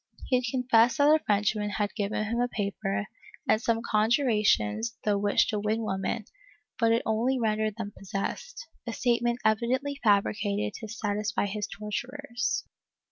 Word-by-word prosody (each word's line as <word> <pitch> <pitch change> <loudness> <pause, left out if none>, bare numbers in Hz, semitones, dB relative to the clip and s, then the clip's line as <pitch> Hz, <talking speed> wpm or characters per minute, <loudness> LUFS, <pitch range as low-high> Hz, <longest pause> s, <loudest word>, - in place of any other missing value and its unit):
He 255 - +3
had 250 - -2
confessed 245 -1 +3
that 290 0 +5
a 315 - +3
Frenchman 210 0 +1
had 205 0 -1
given 210 -1 -1
him 230 +3 -2
a 245 - +2
paper 200 -2 -2 0.4
and 215 - +3
some 230 -1 0
conjurations 220 - +2
through 205 -3 +2
which 205 0 +3
to 210 - 0
win 215 +2 0
women, 195 +2 -2 0.5
but 230 -2 +4
it 230 - +2
only 235 +4 +1
rendered 215 -2 0
them 210 -3 -5
possessed 200 - -5
— - - -34
a 230 - -2
statement 240 0 +1
evidently 255 +6 +1
fabricated 200 - +2
to 220 - -7
satisfy 210 -2 -1
his 205 +1 -3
torturers. 240 +5 -3
220 Hz, 155 wpm, -28 LUFS, 205-240 Hz, 0.5 s, that